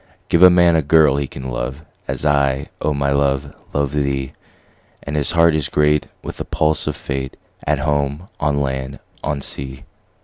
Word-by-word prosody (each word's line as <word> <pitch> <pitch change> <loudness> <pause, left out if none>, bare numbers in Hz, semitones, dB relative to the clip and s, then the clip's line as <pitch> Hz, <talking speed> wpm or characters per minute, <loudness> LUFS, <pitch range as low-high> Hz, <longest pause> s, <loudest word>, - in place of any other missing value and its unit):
Give 85 - +3
a 90 - +10
man 85 -1 +5
a 80 - +3
girl 75 -1 +4
he 70 -1 -1
can 65 -1 -7
love, 65 +4 -4 0.3
As - - -4
I, 70 -2 +2
O 75 - +1
my 70 -1 0
love, 70 0 0 0.2
love 70 -1 0
thee; 70 -2 -1
10 - - -22 0.7
And 70 - -4
his 75 -2 0
heart 85 -1 +5
is 75 -2 -1
great 75 0 +2 0.2
with - - -7
the - - -3
pulse 75 0 0
of - - -1
Fate, 65 -1 -5 0.3
At 75 0 +2
home, 75 +3 -1
on 75 -1 +1
land, 65 0 -3 0.3
on 75 -1 -2
sea. 65 -1 -7
70 Hz, 190 wpm, -19 LUFS, 70-75 Hz, 0.7 s, a